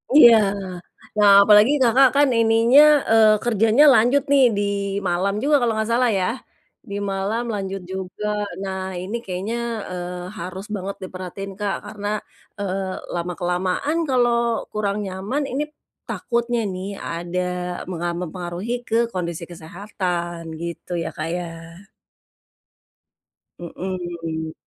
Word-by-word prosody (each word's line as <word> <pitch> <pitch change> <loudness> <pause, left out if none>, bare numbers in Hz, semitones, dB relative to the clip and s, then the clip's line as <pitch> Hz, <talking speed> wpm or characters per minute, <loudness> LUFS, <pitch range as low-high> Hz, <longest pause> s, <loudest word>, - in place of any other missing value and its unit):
Iya, 240 -6 +9 0.8
nah, 205 -1 +7
apalagi 210 +5 +6
Kakak 255 +2 +6
kan 285 0 +5
ininya, 230 +5 +5 0.3
eee, 220 -1 +6
kerjanya 225 +4 +4
lanjut 255 +5 +4
nih 275 -2 +6
di - - +1 0.5
malam 185 +3 0
juga 295 +1 +4
kalau 240 -2 +1
enggak 220 +1 -1
salah 245 +1 +3
ya? 185 - 0 0.6
Di 200 - -4 0.2
malam 200 +5 -1
lanjut 195 -1 -4
juga. 190 +2 -5 0.4
Nah, 190 -1 -4 0.2
ini 195 +5 -5
kayaknya, 190 +5 -3 0.4
eee, 180 0 -5
harus 185 +3 -6
banget 195 0 -5
diperhatiin 185 +1 -7
Kak 205 -1 -1
karena, 205 0 -6 0.5
eee, 190 -1 -3 0.2
lama 175 +1 -2
kelamaan 185 - -1
kalau 235 -3 +1
kurang 205 -1 -1
nyaman 200 +9 -3
ini, 275 +4 -1 0.4
takutnya 235 -1 -1
nih 195 0 -4
ada 175 0 -4 0.4
menga 175 -1 -3
mempengaruhi 180 +6 -4
ke 225 - -1 0.2
kondisi 170 -2 -4
kesehatan 175 -1 -5
gitu 170 +2 -6
ya, - - -4
Kak, 155 - -5
ya. 175 -1 -4 2.1
Mhm. 170 -3 -5
195 Hz, 120 wpm, -22 LUFS, 180-230 Hz, 2.1 s, Iya